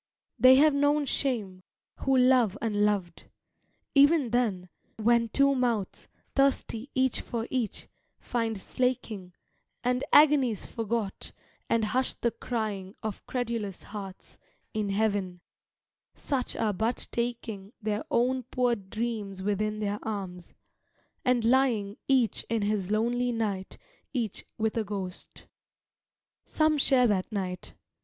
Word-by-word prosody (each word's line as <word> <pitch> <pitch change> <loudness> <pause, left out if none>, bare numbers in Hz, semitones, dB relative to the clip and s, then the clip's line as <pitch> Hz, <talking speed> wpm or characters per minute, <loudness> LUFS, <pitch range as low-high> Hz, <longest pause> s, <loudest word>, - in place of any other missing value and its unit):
They 255 +1 +8
have 300 +2 +6
known 290 +1 +2
shame, 215 -10 -2 0.4
who 270 -1 +2
love 250 -5 +4
unloved. 205 -5 0 0.7
Even 285 -3 +5
then, 215 -7 0 0.3
When 230 +1 +3
two 275 +4 +3
mouths, 240 -6 -1 0.3
thirsty 275 -2 +1
each 260 -1 +2
for 230 -1 -4
each, 245 -5 -2 0.3
find 230 -3 -2
slaking, 215 -6 -2 0.5
And 250 +1 +1
agony's 280 -8 +5
forgot, 225 -3 -3 0.4
and 230 -1 +2
hushed 255 +5 -1
the 235 - +2
crying 210 -6 -4
Of 215 -2 -4
credulous 230 -6 -3
hearts, 195 -3 -9 0.3
in 215 -2 -1
heaven 195 -3 0 0.8
such 265 -3 -2
are 215 -2 0
but 225 +5 -1
taking 230 -4 -3
Their 215 -1 -2
own 255 +2 +2
poor 245 -1 +2
dreams 205 -1 -4
within 210 +1 0
their 205 -1 -2
arms, 190 -5 -6 0.7
and 250 -3 +2
lying 230 -5 +2
Each 255 -5 +2
in 225 -2 0
his 205 -2 -1
lonely 240 +3 +1
night, 205 -5 -3 0.4
each 230 -7 -3
with 220 +1 0
a 225 - +1
ghost. 195 -3 -7 1.0
Some 310 -1 +2
share 260 -2 +4
that 205 -3 +1
night. 185 -3 -4
225 Hz, 120 wpm, -28 LUFS, 205-250 Hz, 1.0 s, They